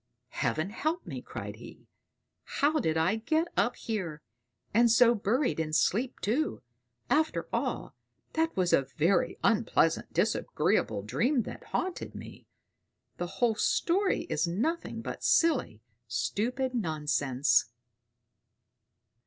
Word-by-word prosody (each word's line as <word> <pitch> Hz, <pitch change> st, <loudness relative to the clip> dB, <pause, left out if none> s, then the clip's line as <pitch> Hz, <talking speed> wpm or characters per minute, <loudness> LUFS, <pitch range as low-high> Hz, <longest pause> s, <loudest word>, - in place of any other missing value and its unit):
"Heaven 155 Hz, +11 st, -1 dB
help 315 Hz, +9 st, -2 dB
me!" -, -, -6 dB
cried -, -, -7 dB
he. -, -, -13 dB, 0.6 s
"How 305 Hz, +2 st, +1 dB
did 160 Hz, -, 0 dB
I 180 Hz, +7 st, +2 dB
get 315 Hz, +9 st, 0 dB
up 240 Hz, -, +2 dB
here 175 Hz, -9 st, -4 dB, 0.5 s
and 235 Hz, +2 st, +5 dB
so 235 Hz, +1 st, +6 dB
buried 235 Hz, -, 0 dB
in 155 Hz, -1 st, -2 dB
sleep, 240 Hz, +10 st, +1 dB
too? 270 Hz, -, -1 dB, 0.4 s
After 315 Hz, +1 st, +1 dB
all, -, -, -2 dB, 0.4 s
that 320 Hz, -6 st, 0 dB
was 180 Hz, -2 st, +2 dB
a 135 Hz, -, +3 dB
very 175 Hz, +4 st, +2 dB
unpleasant, -, -, +2 dB
disagreeable 100 Hz, -, 0 dB
dream 240 Hz, -, +1 dB
that -, -, -9 dB
haunted 370 Hz, -1 st, -3 dB
me! -, -, -10 dB, 0.7 s
The 175 Hz, -, -3 dB
whole 210 Hz, +5 st, +1 dB
story 365 Hz, -, +1 dB
is 330 Hz, -, -1 dB
nothing 255 Hz, -, -2 dB
but -, -, -6 dB
silly, 280 Hz, -, +2 dB, 0.2 s
stupid 225 Hz, -, -1 dB
nonsense!" 150 Hz, -, +1 dB
225 Hz, 120 wpm, -29 LUFS, -, 0.7 s, so